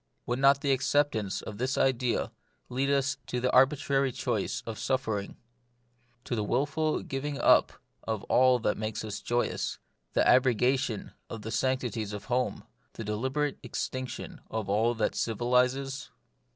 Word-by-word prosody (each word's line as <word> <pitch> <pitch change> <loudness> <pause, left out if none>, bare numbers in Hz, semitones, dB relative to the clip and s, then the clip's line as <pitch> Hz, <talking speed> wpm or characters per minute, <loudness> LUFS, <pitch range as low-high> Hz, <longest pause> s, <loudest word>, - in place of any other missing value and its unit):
Would 120 +1 -1
not 140 0 +5
the 140 - +1
acceptance 130 -7 +1
of 105 -1 -7
this 130 +2 0
idea 125 -2 +1 0.4
lead 135 +3 0
us 135 -1 +1
to 125 - -2
the 125 +1 +1
arbitrary 135 0 +3
choice - - -2
of 115 -2 -5
suffering, 110 -7 -2 0.9
to 120 - -3
the 110 - -1
wilful 145 +7 0
giving 140 +1 -3
up - - +5 0.3
of 110 -2 -3
all 130 0 +4
that 110 -3 -1
makes 110 0 -3
life 105 -1 -5
joyous, 120 0 -1 0.4
the - - +3
abrogation 125 -2 +2 0.2
of 110 -2 -7
the 110 - -5
sanc 130 +3 +1
tities 110 -4 -3
of 105 -1 -6
home, 125 0 -1 0.3
the 115 - -6
deliberate 130 +8 -1
extinction 130 -1 -5
of 110 -3 -3
all 110 +4 +2
that 110 -2 +1
civilises 125 +4 0
125 Hz, 150 wpm, -29 LUFS, 110-135 Hz, 0.9 s, not